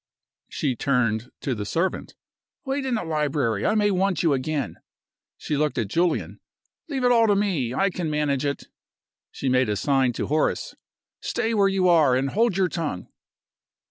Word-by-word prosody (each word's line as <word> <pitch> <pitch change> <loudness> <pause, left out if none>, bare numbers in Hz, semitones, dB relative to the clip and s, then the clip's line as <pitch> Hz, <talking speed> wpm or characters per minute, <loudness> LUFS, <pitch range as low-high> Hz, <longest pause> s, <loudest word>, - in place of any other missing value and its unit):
She 135 -5 -1
turned 120 -3 0
to 135 - -1
the 105 -3 -4
servant. 170 - -2 0.5
"Wait 270 0 -2
in 255 - 0
the 220 - -2
library; 145 - 0
I 215 - +2
may 205 -1 +3
want 190 -3 +1
you 160 -4 +3
again." 140 +2 -2 0.6
She 150 - -3
looked 150 +1 0
at 110 -5 -1
Julian. 170 - 0 0.5
"Leave 270 -3 -2
it 245 - +4
all 230 -2 +5
to 205 - +3
me; 170 - 0
I 195 +5 +2
can 175 -3 -3
manage 150 -2 0
it." 140 -1 -3 0.6
She 135 - -5
made 130 -2 +2
a 105 - 0
sign 135 +3 +2
to - - -3
Horace. 155 +1 0 0.5
"Stay 230 -1 -2
where 200 -2 +4
you 195 -1 +2
are, 155 -7 +5
and 135 +1 0
hold 225 -2 +1
your 190 -1 +3
tongue." 155 - -4
155 Hz, 175 wpm, -24 LUFS, 130-195 Hz, 0.6 s, all